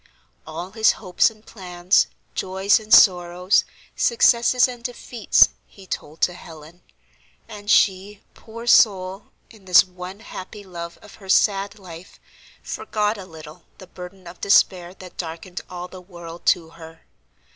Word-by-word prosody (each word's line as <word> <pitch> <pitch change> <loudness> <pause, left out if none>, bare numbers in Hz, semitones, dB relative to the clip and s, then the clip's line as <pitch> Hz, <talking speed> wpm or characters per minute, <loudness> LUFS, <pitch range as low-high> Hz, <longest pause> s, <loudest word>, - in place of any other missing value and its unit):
All 170 +4 -7
his 220 +1 +3
hopes 185 0 +1
and 215 -1 -20
plans, 180 -2 0 0.3
joys 190 +3 +1
and 215 0 -14
sorrows, 180 -3 +5 0.3
successes 250 - +3
and 245 -2 -10
defeats, 240 -2 +2 0.2
he 195 - -16
told 155 -3 -7
to 180 - +2
Helen. 165 0 -14 0.7
And 205 0 -10
she, 200 0 +2
poor 230 +1 -11
soul, 195 -4 +3 0.3
in 215 -4 -18
this 180 -2 +7
one 185 +2 -10
happy 205 -1 -10
love 170 -3 -8
of 210 - -15
her 190 - -13
sad 200 +1 +2
life, 180 -3 -13 0.4
forgot 210 0 -2
a 190 - -9
little 155 -3 -13
the 185 - -12
burden 185 +1 -12
of 170 +1 -12
despair 185 -2 +2
that 185 -1 -13
darkened 170 +2 -7
all 180 0 -7
the 185 0 -12
world 170 -2 -12
to 165 -3 +2
her. 165 0 -14
185 Hz, 145 wpm, -22 LUFS, 175-205 Hz, 0.7 s, this